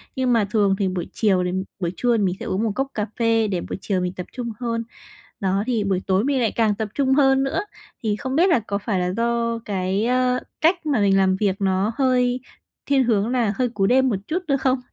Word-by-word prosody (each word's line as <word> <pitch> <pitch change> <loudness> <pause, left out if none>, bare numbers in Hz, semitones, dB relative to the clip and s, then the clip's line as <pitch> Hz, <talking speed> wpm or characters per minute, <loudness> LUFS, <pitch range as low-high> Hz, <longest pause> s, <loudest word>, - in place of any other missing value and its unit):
Nhưng 255 -2 +1
mà 220 -3 +3
thường 200 -3 +3
thì 195 - +1
buổi 185 -2 -3
chiều 190 -5 +2
thì 180 - -1 0.3
buổi 175 -2 -1
trưa 240 +1 +2
thì 205 - +1
mình 185 -1 0
sẽ - - -6
uống 195 +4 -1
một 220 - 0
cốc 270 0 0
cà 210 -1 -1
phê 225 -1 +2
để 185 -4 -2
buổi - - -5
chiều 190 -2 -1
mình 180 0 -2
tập 180 - -6
trung 240 -3 -4
hơn. 230 -1 -2 0.6
Đó, 195 0 0
thì 230 -4 0
buổi 190 -2 0
tối 190 +3 +2
mình 275 -1 +1
lại 225 - +1
càng 220 -3 +1
tập 220 0 -3
trung 265 -2 +2
hơn 270 -1 +4
nữa. 275 +7 -1 0.4
Thì 210 -2 +1
không 260 +3 -4
biết 360 +4 +4
là 335 - +4
có 200 -2 -3
phải 200 -2 -2
là 180 - 0
do 235 0 0
cái, 195 +1 -1
ơ, 250 0 +2 0.2
cách 335 +1 +2
mà 280 -7 +1
mình 195 -1 +4
làm 190 -1 +3
việc 200 -1 0
nó 195 +3 +1
hơi 250 -2 +2 0.5
thiên 275 -2 +3
hướng 220 -3 +1
là 235 -5 +1
hơi 250 -2 0
cú 200 -4 0
đêm 260 +3 +4
một 210 - 0
chút 360 +3 -2
nữa 275 -2 +2
không? 260 -1 +1
225 Hz, 250 wpm, -22 LUFS, 195-255 Hz, 0.6 s, hơn